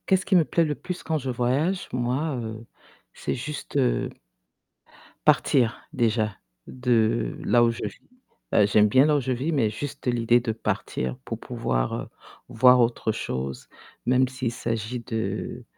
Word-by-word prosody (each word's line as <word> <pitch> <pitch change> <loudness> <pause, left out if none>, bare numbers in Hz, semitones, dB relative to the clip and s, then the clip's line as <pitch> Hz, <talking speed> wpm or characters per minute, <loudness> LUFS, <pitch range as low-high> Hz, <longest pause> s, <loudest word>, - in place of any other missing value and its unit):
Qu'est 190 - +5
ce 190 - -7
qui 195 - +2
me 170 -3 +5
plaît 165 +2 +2
le 150 -1 -1
plus 180 +4 -6
quand 160 - 0
je 135 -3 -4
voyage? 130 +10 0
Moi, 130 +5 -1
heu, 110 0 -7 0.5
c'est - - -3
juste, 145 +3 -5
heu 130 -3 +1 1.2
partir, 120 -4 +3
déjà, 110 -3 +1 0.3
de 115 - +1
là 120 -1 +5
où 120 - +4
je 115 - -4
vis. - - -7 0.5
Heu, 105 - +6
j'aime 105 +1 +4
bien 130 +6 +5
là 150 -1 +3
où - - +2
je 130 -1 -2
vis, 130 +6 -1
mais 130 -8 +2
juste 130 +5 -6
l'idée 120 0 +3
de 120 -2 -2
partir 65 - -3
pour - - -5
pouvoir, - - -2
heu, - - -4 0.4
voir 125 +1 +6
autre 115 -2 +1
chose. 65 - -4 0.4
Même 130 +1 +4
s'il 130 -2 -3
s'agit 115 0 -3
de 110 +1 -4
120 Hz, 165 wpm, -25 LUFS, 110-135 Hz, 1.2 s, Heu